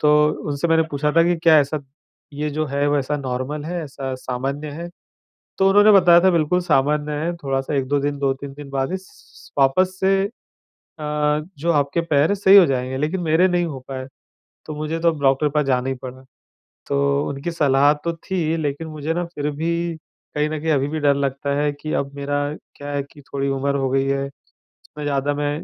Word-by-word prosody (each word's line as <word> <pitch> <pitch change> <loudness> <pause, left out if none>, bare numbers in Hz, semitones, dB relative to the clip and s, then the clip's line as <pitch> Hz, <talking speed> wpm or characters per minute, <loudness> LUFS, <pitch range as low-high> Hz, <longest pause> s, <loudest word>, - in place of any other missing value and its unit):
तो 150 0 +4 0.4
उनसे 145 +4 -1
मैंने 160 0 +4
पूछा 150 +1 0
था 165 - +7
कि, 175 0 +2
"क्या 160 -1 +5
ऐसा, 145 +1 0 0.5
ये 150 +1 -3
जो 155 +1 -2
है, 140 0 0
वैसा 145 0 0
नॉर्मल 135 +2 -4
है, 175 +1 -3
ऐसा 135 -2 -5
सामान्य 135 +4 -4
है?" 170 +4 -6 0.7
तो 195 0 +4
उन्होंने 205 +2 +6
बताया 175 -3 +7
था, 190 - +6
"बिल्कुल 170 +1 +2
सामान्य 150 -1 +1
है। 160 +4 -2
थोड़ा-सा 135 -2 -2
1-2 140 +1 +1
दिन, 145 0 -2
2-3 135 0 -2
दिन 145 -1 -10
बाद 135 -1 -1
ही - - 0
स - - -9
स - - -19
स - - -30
वापस 185 +8 +3
से 195 +1 +2 0.7
अ, - - -8 0.6
जो 165 +4 0
आपके 145 +3 +1
पैर 155 -3 +2
हैं, 200 - +2
सही 195 0 +5
हो 190 - +8
जाएँगे।" 130 -2 -2
लेकिन 155 +7 -1
मेरे 165 +2 +3
नहीं 175 -1 +1
हो 145 -5 -5
पाए। 130 -1 -5 0.6
तो 155 - -5
मुझे 155 +2 -3
तो 170 0 +4
डॉक्टर 135 +1 +3
के - - +1
पास 150 -1 +2
जाना 130 -1 +1
ही 135 - 0
पड़ा। 130 0 -8 0.7
तो 140 - 0 0.3
उनकी 140 +5 -4
सलाह 145 -3 +4
तो 170 - -1
थी, 165 -1 -2
लेकिन 155 +1 -3
मुझे 155 0 -3
ना, 175 +1 -1
फिर 150 -3 -4
भी 170 +1 -2 0.4
कहीं 150 +1 +1
न 155 - -3
कहीं 160 - 0
अभी 140 -2 +2
भी 155 +1 -3
डर 145 -1 +3
लगता 140 +1 -1
है 145 0 +1
कि 155 - -4
अब 140 0 -8
मेरा 145 0 -2 0.4
क्या 145 0 -7
है 140 - -1
कि 145 +1 -17
थोड़ी 140 0 -3
उमर 140 +1 0
हो 135 -1 0
गई 135 +1 +1
है। 135 0 0 0.5
इतना 150 - -11
ज़्यादा 145 0 0
मैं 145 0 -1
145 Hz, 210 wpm, -21 LUFS, 140-165 Hz, 0.7 s, हो